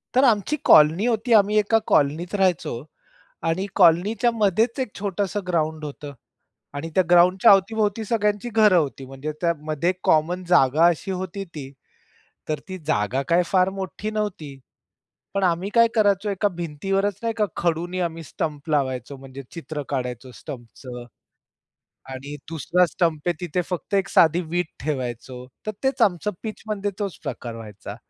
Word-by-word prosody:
तर 260 Hz, -, +5 dB
आमची 235 Hz, +4 st, +3 dB
कॉलनी 160 Hz, +8 st, +6 dB
होती 230 Hz, 0 st, +1 dB
आम्ही 210 Hz, 0 st, +5 dB
एका 215 Hz, +2 st, +3 dB
कॉलनीत 155 Hz, +7 st, +1 dB
राहायचो. 180 Hz, -10 st, 0 dB, 0.6 s
आणि 165 Hz, +4 st, -1 dB
कॉलनीच्या 200 Hz, +7 st, +4 dB
मध्येच 225 Hz, +4 st, +1 dB
एक 255 Hz, -6 st, -3 dB
छोटसं 200 Hz, 0 st, -2 dB
ग्राउंड 160 Hz, -2 st, -1 dB
होतं. 145 Hz, 0 st, -8 dB, 0.6 s
आणि 150 Hz, +3 st, -4 dB
त्या 185 Hz, -, +5 dB
ग्राउंडच्या 180 Hz, +5 st, +6 dB
अवती-भोवती 210 Hz, +2 st, +2 dB
सगळ्यांची 210 Hz, 0 st, 0 dB
घरं 215 Hz, -4 st, +4 dB
होती. 140 Hz, -4 st, 0 dB
म्हणजे 135 Hz, +3 st, -6 dB
त्यामध्ये 165 Hz, 0 st, 0 dB
कॉमन 175 Hz, +4 st, +2 dB
जागा 160 Hz, -1 st, +5 dB
अशी 175 Hz, +3 st, 0 dB
होती 190 Hz, +1 st, -4 dB
ती 135 Hz, -3 st, -7 dB, 0.8 s
तर 155 Hz, -2 st, -1 dB
ती 185 Hz, 0 st, -6 dB
जागा 130 Hz, -1 st, 0 dB
काय 170 Hz, +1 st, +4 dB
फार 185 Hz, 0 st, +3 dB
मोठी 195 Hz, +2 st, -5 dB
नव्हती. 180 Hz, -10 st, -4 dB, 0.8 s
पण 195 Hz, -1 st, 0 dB
आम्ही 180 Hz, +2 st, +1 dB
काय 230 Hz, -1 st, +6 dB
करायचो 205 Hz, -1 st, +2 dB
एका 200 Hz, +1 st, +1 dB
भिंतीवरच 195 Hz, +5 st, -1 dB
नाही 230 Hz, -1 st, 0 dB
का 210 Hz, -, +3 dB
खडूनी 175 Hz, +2 st, -1 dB
आम्ही 165 Hz, 0 st, -9 dB
स्टंप 150 Hz, 0 st, -5 dB
लावायचो 135 Hz, -2 st, -1 dB
म्हणजे 135 Hz, 0 st, -10 dB
चित्र 155 Hz, -3 st, -6 dB
काढायचो 125 Hz, -2 st, -4 dB
स्टंपचं 125 Hz, 0 st, -9 dB, 1.1 s
आणि 140 Hz, +3 st, -7 dB
दुसरा 170 Hz, +3 st, +2 dB
स्टंप 165 Hz, -2 st, -1 dB
आहे 175 Hz, -, +3 dB
तिथे 175 Hz, +1 st, -1 dB
फक्त 180 Hz, +3 st, -5 dB
एक 195 Hz, 0 st, +1 dB
साधी 170 Hz, +2 st, +4 dB
वीट 175 Hz, -2 st, 0 dB, 0.2 s
ठेवायचो 125 Hz, -3 st, -4 dB, 0.2 s
तर 215 Hz, -, -1 dB
तेच 265 Hz, -2 st, 0 dB
आमचं 205 Hz, 0 st, +2 dB
पिच 215 Hz, -1 st, -6 dB
मध्ये 205 Hz, -1 st, -2 dB
तोच 200 Hz, -6 st, -3 dB
प्रकार 115 Hz, -2 st, -5 dB
व्हायचा. 105 Hz, -2 st, -9 dB
175 Hz, 150 wpm, -23 LUFS, 150-205 Hz, 1.1 s, कॉलनी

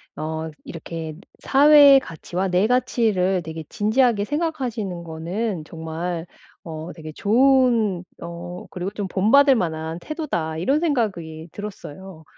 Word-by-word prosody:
어 160 Hz, +1 st, -4 dB
'이렇게 165 Hz, -1 st, -7 dB, 0.2 s
사회의 285 Hz, 0 st, +7 dB
가치와 180 Hz, -, -4 dB
내 185 Hz, +3 st, +2 dB
가치를 220 Hz, -7 st, +1 dB
되게 160 Hz, -1 st, -7 dB
진지하게 220 Hz, 0 st, +2 dB
생각하시는 245 Hz, -, -3 dB
거는 170 Hz, +2 st, -4 dB
정말 165 Hz, +1 st, -5 dB, 0.4 s
어 160 Hz, 0 st, -7 dB
되게 155 Hz, -2 st, -8 dB
좋은 235 Hz, -, +3 dB, 0.2 s
어 170 Hz, +1 st, -7 dB
그리고 180 Hz, +1 st, -4 dB
좀 205 Hz, -2 st, -5 dB
본받을 270 Hz, +8 st, +5 dB
만한 160 Hz, -3 st, -3 dB
태도다.' 280 Hz, -, -3 dB
이런 265 Hz, -, +1 dB
생각이 190 Hz, -, -2 dB
들었어요. 190 Hz, -4 st, -9 dB
185 Hz, 270 characters per minute, -22 LUFS, 165-245 Hz, 0.4 s, 사회의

